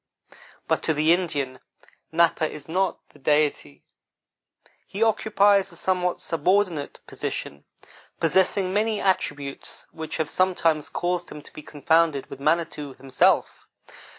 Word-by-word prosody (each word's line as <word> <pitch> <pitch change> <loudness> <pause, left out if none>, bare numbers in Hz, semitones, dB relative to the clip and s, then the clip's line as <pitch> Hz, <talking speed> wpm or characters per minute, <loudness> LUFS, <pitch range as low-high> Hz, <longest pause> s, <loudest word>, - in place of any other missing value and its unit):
But - - +1
to 160 - 0
the 155 +3 +4
Indian, 145 -8 -2 0.5
Napa 160 -1 +2
is 150 -2 -9
not 185 +3 0
the 150 - -20
Deity; 145 - 0 1.0
he 205 +3 -1
occupies 205 -3 +3
a - - -10
somewhat 180 0 0
subordinate 170 -1 0
position, 70 0 -6 0.5
possessing 185 +3 +2
many 215 +1 +1
attributes 145 -7 -2
which 160 -1 -6
have 160 -2 -1
sometimes 165 -5 +1
caused 175 0 -2
him 150 - -9
to - - -16
be - - -9
confounded 155 0 +1
with - - -8
Manitou, 150 -2 -1
himself. 130 -1 +1
165 Hz, 125 wpm, -24 LUFS, 150-185 Hz, 1.0 s, the